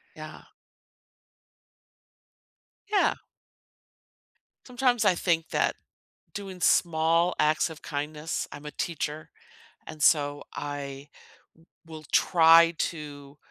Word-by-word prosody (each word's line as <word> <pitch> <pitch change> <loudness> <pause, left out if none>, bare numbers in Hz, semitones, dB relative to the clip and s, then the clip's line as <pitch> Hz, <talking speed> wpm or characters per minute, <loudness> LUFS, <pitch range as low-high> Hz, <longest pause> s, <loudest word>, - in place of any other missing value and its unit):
Yeah. - - -10 2.5
Yeah. 410 - +3 1.5
Sometimes, 245 -2 +1
I 195 -3 +4
think 170 -2 -1
that - - 0 0.6
doing 195 -3 -7
small 165 +1 +2
acts 155 +2 +2
of 160 - -10
kindness 150 +1 -4
I'm 145 +1 -10
a - - -5
teacher, 155 -1 -5 0.6
and 155 -1 -10
so, 145 -2 +2
I 140 -1 -6 0.8
will 160 -1 -10
try 165 -1 +5
to 145 -3 -6
160 Hz, 90 wpm, -27 LUFS, 150-170 Hz, 2.5 s, try